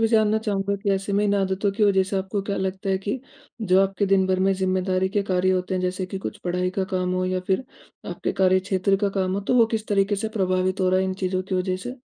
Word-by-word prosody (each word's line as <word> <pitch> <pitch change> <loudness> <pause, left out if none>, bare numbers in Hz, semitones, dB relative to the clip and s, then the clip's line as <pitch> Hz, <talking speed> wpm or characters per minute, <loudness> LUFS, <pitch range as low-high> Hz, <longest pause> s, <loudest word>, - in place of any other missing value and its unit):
भी 225 - +3
जानना 220 -1 +3
चाहूँगा 200 -2 -1
कि, 200 0 -2
ऐसे 195 +1 -2
में 205 +1 +2
इन 205 0 +2
आदतों 195 +1 0
की 210 +2 +1
वजह 190 -2 +4
से 195 +1 -3
आपको 190 +1 -2
क्या 200 0 -3
लगता 190 +1 -3
है 190 - +1
कि 205 +6 -3 0.4
जो 190 -1 +4
आपके 195 +1 0
दिन 190 -1 +3
भर 185 0 +1
में 195 +1 +3
ज़िम्मेदारी 185 0 0
के 205 +1 0
कार्य 185 -1 +1
होते 185 0 -1
हैं, 185 - 0
जैसे 185 0 -2
कि 190 +1 -5
कुछ 205 +2 -6
पढ़ाई 180 +1 0
का 190 - +2
काम 180 0 0
हो, 185 0 0
या 185 0 -1
फिर 195 +7 0 0.5
आपके - - -3
कार्य 185 0 +3
क्षेत्र 195 0 +1
का - - +3
काम 185 0 0
हो, 200 - -1
तो 200 - 0
वो 230 -2 +6
किस 215 - -7
तरीके 200 0 +2
से 220 +2 -2
प्रभावित 185 0 0
हो 185 - +3
रहा 185 - +3
है, 190 - +1
इन 190 0 -2
चीज़ों 185 -1 -2
की 190 0 -4
वजह 185 0 0
से? 250 +2 -6
190 Hz, 275 wpm, -24 LUFS, 185-200 Hz, 0.5 s, वो